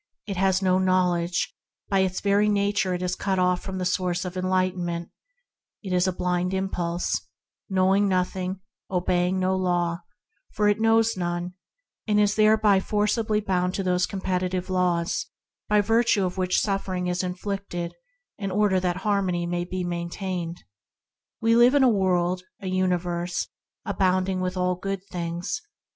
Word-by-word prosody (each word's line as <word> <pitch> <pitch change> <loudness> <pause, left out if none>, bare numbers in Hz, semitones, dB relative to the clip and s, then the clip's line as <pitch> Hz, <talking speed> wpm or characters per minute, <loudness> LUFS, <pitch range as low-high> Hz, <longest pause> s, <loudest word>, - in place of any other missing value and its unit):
It 200 -2 -4
has 190 +1 +2
no 185 0 +3
real 185 - +1
knowledge; 180 -1 +1 0.3
by 195 - +2
its 185 -1 0
very 205 +1 +3
nature 200 -2 +1
it 180 - -4
is 180 0 -1
cut 190 0 -1
off 180 -1 +2
from 190 -1 -5
the 185 - -2
source 180 0 0
of 180 0 -5
enlighten 185 0 0
ment; 170 0 -4 0.7
it 190 -2 -3
is 180 +1 +3
a - - +2
blind 180 +1 -1
impulse, 175 -2 -2 0.4
knowing 190 +1 +3
nothing; 185 0 -1 0.3
obeying 180 0 +1
no 185 0 +1
law, 175 -2 0 0.5
for 210 - +2
it 205 +1 +2
knows 225 0 +4
none; 175 0 -3 0.5
and 210 -1 +3
is 205 0 +3
thereby 215 -2 +5
forcibly 210 +2 0
bound 185 -2 0
to 195 - -1
those 180 -1 +1
competitive 185 -1 -2
laws 180 -2 0 0.4
by 210 0 +5
virtue 225 -2 +2
of 180 - -3
which 185 -1 +1
suffering 195 -3 -1
is 180 0 0
inflicted 185 -1 -4 0.5
in 195 -2 -2
order 195 -1 +2
that 180 -1 -1
harmony 190 -4 +1
may 175 0 -1
be 180 +1 -4
maintained. 175 0 -4 0.8
We 230 0 +4
live 240 +3 +6
in 280 - +5
a - - +6
world, 180 -3 +1 0.2
a 200 - -10
universe, 180 -1 -1 0.4
abounding 185 0 +1
in 180 - 0
all 180 0 +1
good 195 +1 -4
things. 175 - -3
185 Hz, 155 wpm, -25 LUFS, 180-195 Hz, 0.8 s, live